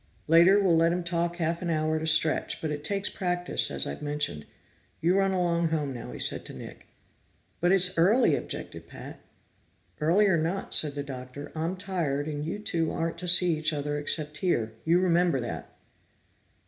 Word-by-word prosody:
Later 170 +5 +6
we'll 185 -4 +3
let 165 +1 +3
him 180 0 -2
talk 170 0 -1
half 170 0 -2
an 175 - -3
hour 155 -1 0
at 155 - -2
a 160 - -2
stretch, 155 0 +2
but 155 - -3
it 145 0 -5
takes 200 +4 -1
practice, 180 -1 -1
as - - -1
I've 70 - -6
mentioned. 145 - -2 0.5
You 175 +3 +2
run 195 0 +2
along 170 -2 +1
home 150 -4 -2
now," 120 - -8
he - - -8
said - - 0
to - - -9
Nick. - - -11 0.7
"But 175 +1 +2
it's 185 -1 +4
early!" 210 +10 +4
objected - - -7
Pat. - - -11 0.8
"Early 170 +7 +3
or 190 -4 +3
not," 170 +5 -2
said 150 -2 +2
the 145 - -3
Doctor, 130 +1 -8
"I'm 165 +4 -3
tired, 165 -7 -2
and 150 -1 -4
you 165 +6 -4
two 165 -6 -2
aren't 165 0 -3
to 180 - -5
see 175 -1 +5
each 155 +1 0
other 145 0 -3
except 150 0 0
here. 115 -12 0
You 170 +2 +3
remember 175 -5 +2
that." 100 - -6
165 Hz, 190 wpm, -27 LUFS, 150-180 Hz, 0.8 s, Later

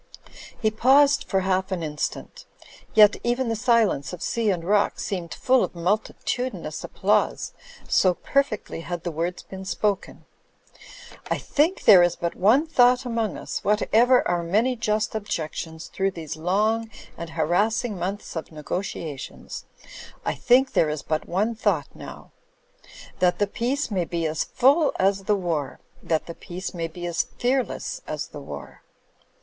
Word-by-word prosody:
He 215 -2 +1
paused 275 +6 +4
for 190 -1 0
half 190 0 0
an 180 -3 -2
instant; 150 -1 -4 0.5
yet 210 -1 +7
even 240 +1 0
the 225 - 0
silence 220 - +2
of 180 - -6
sea 230 -2 0
and 180 -4 0
rock 200 +3 +2
seemed 175 -4 -4
full 260 -1 +2
of - - -4
multitudinous 215 +7 -2
applause, - - 0 0.3
so 185 -2 +3
perfectly 275 -11 -1
had 175 0 -5
the 175 - -2
words 170 +3 -3
been 190 0 -9
spoken. 200 +1 -2 1.0
"I - - +1
think 315 +6 0
there 195 -5 +9
is 175 -1 +3
but 170 0 -3
one 235 - +4
thought 250 -4 +4
among 230 -3 -1
us, - - -5
what 210 +1 +2
ever 245 +3 +5
our 175 -1 +1
many 215 +10 +1
just 220 -1 -1
objections 160 -5 -4
through 195 0 -1
these 165 -6 -6
long 210 +7 0 0.3
and 170 0 -7
harassing 205 +9 0
months 190 +3 -4
of 160 - -5
negotiations 155 -2 -6 0.3
— - - -14
I - - 0
think 260 +2 +3
there 160 - +3
is 150 -1 -4
but 155 0 -2
one 205 +6 +1
thought 225 - 0
now. - - -11 0.9
That 180 -1 +3
the 205 - +2
peace 240 +6 -2
may 185 -4 0
be 170 -1 -2
as 155 0 -1
full 285 +4 +3
as 195 0 +1
the 210 - +3
war 165 -8 -2
— - - -29
^that 160 -2 0
the 170 - -7
peace 180 +3 -7
may 165 -2 -3
be 175 +2 -8
as 170 -1 -1
fearless 250 -3 -1
as 150 -1 -4
the 145 - -9
war." 70 - -9
195 Hz, 160 wpm, -24 LUFS, 170-230 Hz, 1.0 s, there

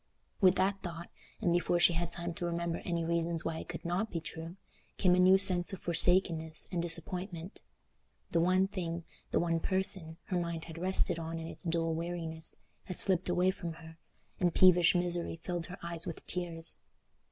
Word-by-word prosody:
With 185 -1 +5
that 195 +1 0
thought, 170 -1 -7 0.3
and 175 -5 +1
before 175 0 +1
she 175 - +5
had 170 0 -2
time 170 0 -5
to 175 - -3
remember 170 0 -2
any 170 -2 -3
reasons 170 0 -1
why 160 -1 -3
it - - -10
could - - -7
not 185 +6 -1
be 170 - -3
true, 165 +2 -7 0.4
came 180 -2 +3
a 180 - +3
new 185 +1 +6
sense 190 -1 +6
of 190 - -6
forsakenness 165 -2 +3
and 175 -2 -1
disappointment. 175 +1 -4 0.7
The 170 - +2
one 185 +3 +3
thing—the 170 -4 -5
one 165 -1 0
person—her 185 -1 -1
mind 170 -2 -4
had 165 0 -9
rested 180 -1 +2
on 165 0 -5
in 165 - -6
its 165 - -9
dull 165 -1 0
weariness, 165 -1 -4 0.3
had 185 - -7
slipped 185 -2 +6
away 180 +1 +2
from 175 -3 -6
her, 160 0 -14 0.4
and 175 -2 +1
peevish 180 -1 +6
misery 175 -1 0
filled 170 0 -5
her 180 - -9
eyes 170 -1 -5
with 165 - -7
tears. 170 -2 -2
170 Hz, 180 wpm, -31 LUFS, 165-180 Hz, 0.7 s, new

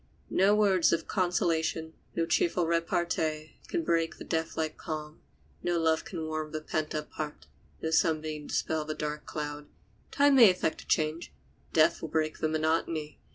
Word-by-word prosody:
No 195 +3 +4
words 195 -5 +4
of 165 - 0
consolation, 165 -3 0 0.2
no 165 - +1
cheerful 170 +1 +2
repartee 165 -2 -1
can 345 -2 -1
break 165 - 0
the - - -8
death 160 0 -2
like 155 -1 -1
calm; 155 0 -6 0.4
no 175 -1 0
love 160 -1 +2
can 165 -4 -5
warm 155 0 -4
the 155 - -1
pent 155 0 -2
up 150 0 -4
heart, 150 -1 -6 0.4
no 160 - -1
sunbeam 155 -2 +1
dispel 160 -1 -1
the 155 0 -4
dark 150 0 -4
cloud. 150 -1 -5 0.4
Time 285 0 +4
may 230 -5 +10
effect 180 -3 -1
a - - -17
change; 155 +2 0 0.4
death 155 -1 +4
will 160 - -5
break 155 0 -1
the 155 - +1
monotony. 155 0 -1
160 Hz, 165 wpm, -29 LUFS, 155-170 Hz, 0.4 s, may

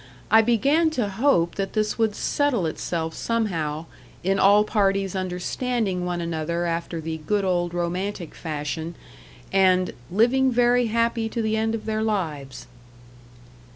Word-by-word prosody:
I 220 - +8
began 275 +9 +3
to 230 -4 +1
hope 195 -6 +2
that 195 -1 -2
this 215 +1 -1
would 220 -2 +2
settle 280 - 0
itself 160 +1 -3
somehow 165 -10 -2 0.4
in 195 +2 +1
all 205 +2 +6
parties 195 -3 +1
understanding 185 +2 -2
one 175 -1 -2
another 170 +1 -2
after 170 0 -2
the 160 0 -4
good 200 +6 0
old 175 -2 0
romantic 175 +1 -3
fashion, 160 +1 -4 0.6
and 185 -1 +3 0.2
"living 245 +7 +3
very 245 0 +3
happy 230 0 0
to 230 0 -2
the 220 0 0
end 220 +1 0
of 220 - -7
their 220 0 -1
lives." 160 -11 -3
195 Hz, 140 wpm, -24 LUFS, 170-225 Hz, 0.6 s, I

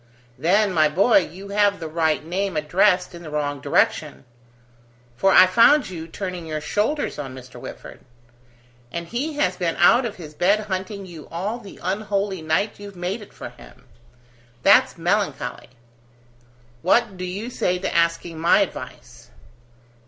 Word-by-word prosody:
"Then, 190 +6 +2
my 155 -3 +4
boy, 200 +9 +4
you 190 +3 -7
have 205 0 +2
the 165 - -5
right 160 -1 0
name 185 +1 -2
addressed 180 +5 +2
in 170 - -10
the 160 - -9
wrong 145 -2 -2
direction: - - 0 0.9
for 195 +10 +3
I 185 - +8
found 230 +6 +4
you 165 -2 -7
turning 180 -1 -6
your 155 -1 -3
shoulders 210 - -1
on 135 -3 -6
Mr. 125 -1 -12
Whitford. - - -10 0.9
And 170 0 -5
he 280 +7 -2
has 185 -11 0
been 170 -2 -1
out 235 +8 +5
of 215 - -8
his 155 -4 -10
bed 195 +7 +2
hunting 195 0 -4
you 170 -4 -11
all 200 +8 -3
the 205 -4 -12
unholy 195 0 -2
night 160 +8 -1
you've 200 -1 -10
made 180 +5 -3
it 205 - -13
for - - -8
him. - - -17 0.8
That's - - +5
melancholy. - - -1 1.1
What 210 +3 +2
do 185 - -7
you 200 +7 -5
say 180 -6 0
to 190 - -4
asking 170 -1 0
my 170 +2 +4
advice?" - - -6
185 Hz, 155 wpm, -22 LUFS, 165-205 Hz, 1.1 s, I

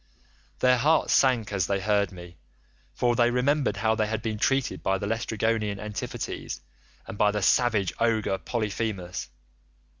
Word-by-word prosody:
"Their 125 -1 +4
hearts 155 +5 +3
sank 120 -6 +3
as 95 -4 0
they 100 -1 0
heard 100 +1 +1
me, 85 -2 -12 0.5
for 120 -1 +1
they 120 0 +4
remembered 135 +3 +1
how 110 0 +2
they 110 -1 0
had 110 +1 -3
been 110 -2 -3
treated 135 +2 0
by 95 0 +1
the 100 - -4
Laestrygonian 110 -1 -1
Antiphates, 105 0 -5 0.5
and - - -9
by 105 - +5
the 105 -1 -2
savage 105 -4 +2
ogre 110 -4 +1
Polyphemus. 105 -5 -3
110 Hz, 150 wpm, -26 LUFS, 100-120 Hz, 0.5 s, by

